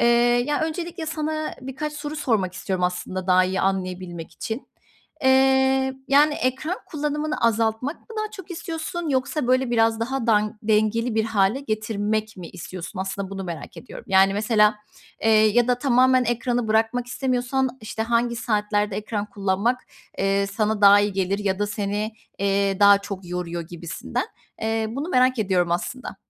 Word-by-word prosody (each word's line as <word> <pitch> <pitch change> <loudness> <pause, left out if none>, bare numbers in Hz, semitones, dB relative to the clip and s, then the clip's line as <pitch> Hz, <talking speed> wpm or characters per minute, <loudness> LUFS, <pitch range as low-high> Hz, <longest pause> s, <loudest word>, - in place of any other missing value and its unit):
Eee, 235 - +4 0.4
ya 295 0 0
öncelikle 325 +1 -3
sana 310 0 -3
birkaç 265 +4 -5
soru 300 0 -6
sormak 220 -11 0
istiyorum 185 -2 -2
aslında 180 +1 -3
daha 185 0 +5
iyi 190 +1 -1
anlayabilmek 185 -3 -3
için. 225 +4 -6 0.5
Eee, 265 0 +4
yani, 295 +2 +5
ekran 265 +8 -1
kullanımını 300 0 -2
azaltmak 230 +5 0
mı - - -30
daha 430 0 -2
çok 380 -4 -11
istiyorsun? 330 -1 -4
Yoksa, 275 0 0
böyle, 255 0 +2
biraz 225 -1 +2
daha 255 +1 -2
dan 215 -1 +2
dengeli 220 +2 +1
bir 220 0 +2
hâle 220 +2 +1
getirmek 215 -2 -2
mi 175 -3 -8
istiyorsun? 185 +2 -8
Aslında 195 0 -4
bunu 195 -1 -5
merak 170 -2 -7
ediyorum. 255 - -10
Yani, 195 +1 +5
mesela, 210 0 +3 0.5
eee, 225 - +3
ya 220 +2 +4
da 250 - +4
tamamen 255 -1 +4
ekranı 240 -1 -1
bırakmak 225 +3 +1
istemiyorsan, 255 0 -1
işte, 220 0 -4
hangi 235 +1 +1
saatlerde 210 -2 0
ekran 210 -1 -3
kullanmak 205 +5 0 0.7
sana, 215 +1 +1
eee, 210 - -6
daha 205 0 +8
iyi 205 -1 0
gelir 195 +1 0
ya 195 -2 -1
da 205 - 0
seni, 210 +1 -2 0.3
eee, 195 0 +1
daha 200 0 +8
çok 200 -2 -7
yoruyor 175 -1 -3
gibisinden. 170 0 -5 0.4
Eee, 225 0 0
bunu 280 +7 -4
merak 255 -4 +3
ediyorum 185 -5 +1
aslında. 250 +9 -4
220 Hz, 155 wpm, -23 LUFS, 200-260 Hz, 0.7 s, daha